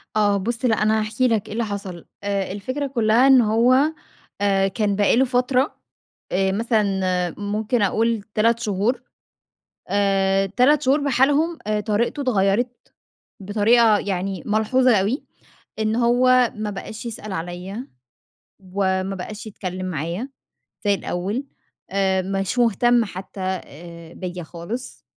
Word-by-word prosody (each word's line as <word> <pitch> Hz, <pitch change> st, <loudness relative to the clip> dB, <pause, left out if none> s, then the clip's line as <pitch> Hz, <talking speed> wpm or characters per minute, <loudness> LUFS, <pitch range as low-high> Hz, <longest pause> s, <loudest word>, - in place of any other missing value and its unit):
آه 205 Hz, -1 st, +3 dB
بُص 230 Hz, +5 st, -2 dB
لأ 225 Hz, -, +3 dB
أنا 220 Hz, +1 st, +3 dB
هاحكي 220 Hz, +4 st, 0 dB
لك 225 Hz, -4 st, 0 dB
إيه -, -, -7 dB
اللي 230 Hz, 0 st, -1 dB
حصل، 195 Hz, -4 st, -6 dB, 0.2 s
آآ 200 Hz, -2 st, -1 dB
الفكرة 255 Hz, +8 st, -3 dB
كلّها 235 Hz, 0 st, +3 dB
إنّه 240 Hz, -5 st, +5 dB
هو، 255 Hz, +7 st, +4 dB, 0.5 s
آآ 195 Hz, -1 st, +2 dB
كان 205 Hz, 0 st, -1 dB
بقى 205 Hz, +2 st, +3 dB
له 265 Hz, -, +4 dB
فترة، 255 Hz, +2 st, +1 dB, 0.6 s
آآ 190 Hz, +1 st, +1 dB
مثلًا 220 Hz, +1 st, +1 dB, 0.6 s
ممكن 210 Hz, +3 st, -1 dB
أقول 220 Hz, +2 st, +1 dB
3 230 Hz, +2 st, +3 dB
شهور، 215 Hz, +2 st, -1 dB, 0.9 s
آآ 195 Hz, -1 st, +2 dB
3 255 Hz, +9 st, +3 dB
شهور 275 Hz, +3 st, +3 dB
بحالهم، 290 Hz, +5 st, +2 dB
آآ 210 Hz, 0 st, +1 dB
طريقته 220 Hz, +7 st, -1 dB
اتغيرت، 235 Hz, 0 st, 0 dB, 0.5 s
بطريقة 215 Hz, +2 st, +4 dB
يعني 190 Hz, -2 st, -3 dB
ملحوظة 225 Hz, +3 st, +3 dB
أوي، 210 Hz, +9 st, -1 dB, 0.6 s
إن 220 Hz, 0 st, 0 dB
هو 245 Hz, +1 st, +4 dB
ما 210 Hz, -1 st, -3 dB
بقاش 215 Hz, +3 st, -7 dB
يسأل 215 Hz, -3 st, -6 dB
عليّا، 180 Hz, +7 st, -6 dB, 0.9 s
وما 190 Hz, 0 st, 0 dB
بقاش 210 Hz, +4 st, -7 dB
يتكلّم 185 Hz, -2 st, -5 dB
معايا 175 Hz, -, -3 dB, 0.6 s
زي 205 Hz, -, +4 dB
الأوّل، 195 Hz, +6 st, -3 dB, 0.5 s
آآ 190 Hz, -1 st, +1 dB
مش 195 Hz, +5 st, -2 dB
مهتم 240 Hz, +1 st, +3 dB
حتّى 190 Hz, 0 st, -8 dB
آآ 170 Hz, -2 st, -6 dB
بيّا 180 Hz, -1 st, -6 dB
خالص، 180 Hz, +10 st, -7 dB
210 Hz, 130 wpm, -22 LUFS, 195-240 Hz, 0.9 s, إنّه